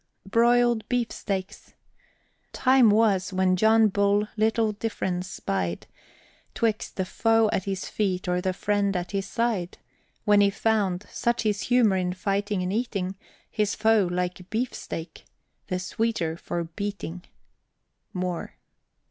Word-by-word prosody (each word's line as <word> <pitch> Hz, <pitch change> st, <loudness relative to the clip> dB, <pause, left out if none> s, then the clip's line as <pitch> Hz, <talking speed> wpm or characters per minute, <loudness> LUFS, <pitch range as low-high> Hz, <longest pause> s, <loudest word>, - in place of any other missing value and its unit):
BROILED 235 Hz, +2 st, +3 dB
BEEFSTEAKS. 215 Hz, -6 st, -3 dB, 0.8 s
Time 255 Hz, -3 st, +5 dB
was, 205 Hz, -3 st, +3 dB
when 185 Hz, 0 st, +2 dB
John 220 Hz, +3 st, +5 dB
Bull 200 Hz, +1 st, +2 dB
little 220 Hz, 0 st, +2 dB
difference 190 Hz, -4 st, -3 dB
spied 90 Hz, -, -3 dB, 0.7 s
'Twixt 220 Hz, -2 st, -1 dB
the 190 Hz, -, -1 dB
foe 225 Hz, +2 st, +2 dB
at 190 Hz, -, -1 dB
his 195 Hz, -1 st, -3 dB
feet 190 Hz, -4 st, -1 dB
or 180 Hz, 0 st, +1 dB
the 185 Hz, 0 st, 0 dB
friend 200 Hz, 0 st, 0 dB
at 175 Hz, 0 st, -4 dB
his 195 Hz, -1 st, -2 dB
side; 225 Hz, -7 st, -1 dB, 0.5 s
When 205 Hz, -1 st, +5 dB
he 200 Hz, -, +5 dB
found, 200 Hz, -3 st, 0 dB
such 235 Hz, 0 st, 0 dB
his 210 Hz, -2 st, 0 dB
humor 235 Hz, -6 st, +3 dB
in 180 Hz, -1 st, -1 dB
fighting 200 Hz, +1 st, -1 dB
and 180 Hz, +1 st, -2 dB
eating, 200 Hz, -5 st, -2 dB, 0.4 s
His 210 Hz, -2 st, 0 dB
foe, 220 Hz, -4 st, +3 dB
like 180 Hz, 0 st, -3 dB
beefsteak, 220 Hz, -7 st, -4 dB, 0.4 s
the 185 Hz, -, -1 dB
sweeter 185 Hz, -3 st, -1 dB
for 170 Hz, 0 st, -4 dB
beating. 180 Hz, 0 st, -5 dB, 0.9 s
MOORE. 180 Hz, -2 st, -4 dB
200 Hz, 130 wpm, -26 LUFS, 185-220 Hz, 0.9 s, Time